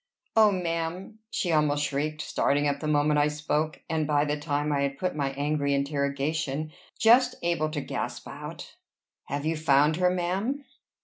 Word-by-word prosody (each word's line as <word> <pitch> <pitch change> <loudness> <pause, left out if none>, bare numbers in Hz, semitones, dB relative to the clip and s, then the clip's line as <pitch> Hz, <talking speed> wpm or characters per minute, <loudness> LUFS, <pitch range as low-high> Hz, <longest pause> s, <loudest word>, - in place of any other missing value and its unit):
"O 215 -2 +6
ma'am!" 180 +3 -3
she 185 -7 -1
almost 150 -2 +2
shrieked, 150 +2 -2
starting 145 +1 +1
up 140 0 0
the 155 - -4
moment 150 0 +3
I 145 - +4
spoke, 150 +1 -2
and, 160 -2 -1
by 145 -1 +2
the 145 0 0
time 145 0 -1
I 140 -1 +1
had 140 0 -1
put 185 -2 -2
my 140 -2 0
angry 145 0 0
interrogation, 140 +1 -1 0.3
just 235 +3 +5
able 170 -3 +1
to 150 -2 -3
gasp - - -4
out - - -9 0.5
"Have 145 +1 -4
you 160 +1 +1
found 150 0 +3
her, 180 0 +3
ma'am?" 190 +11 -1
150 Hz, 170 wpm, -27 LUFS, 145-165 Hz, 0.5 s, O